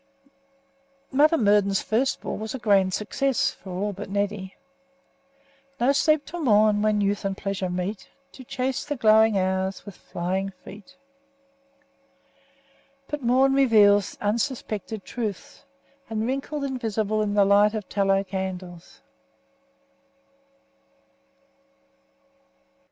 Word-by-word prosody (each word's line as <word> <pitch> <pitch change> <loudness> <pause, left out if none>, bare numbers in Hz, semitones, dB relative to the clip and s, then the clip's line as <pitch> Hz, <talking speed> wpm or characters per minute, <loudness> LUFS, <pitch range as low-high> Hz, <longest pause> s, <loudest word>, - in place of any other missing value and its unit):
Mother 305 +4 +4
Murden's 205 -4 +2
first 245 +5 0
ball - - -4
was 220 +4 -5
a - - -3
grand 200 -5 +2
success 250 +7 0
for 190 - -14
all 200 +3 -3
but 195 +1 -8
Neddy. 200 -1 -3 1.2
"No 245 +3 +3
sleep 305 +1 +2
till 350 - -7
morn 210 -5 +4
when 215 -1 +1
youth 200 +1 0
and 195 -1 -2
pleasure 195 -2 -3
meet, 180 +3 -4 0.2
To 260 - -12
chase 255 +1 -3
the 290 - -4
glowing 220 -3 +4
hours 190 0 -1
with 205 -3 -10
flying 190 +3 -3
feet." 210 +8 -13 2.1
But 295 -1 -4
morn 260 +2 +3
reveals 210 -7 +4
unsuspected 220 -2 -3
truths, 220 -5 -6 0.4
and 220 0 -2
wrinkled 275 +3 -3
invisible 220 -5 -1
in 205 -1 -1
the 200 -1 +5
light 205 +2 +4
of 210 -3 -5
tallow 195 -1 +1
candles. 185 -3 -7
210 Hz, 115 wpm, -25 LUFS, 195-245 Hz, 2.1 s, the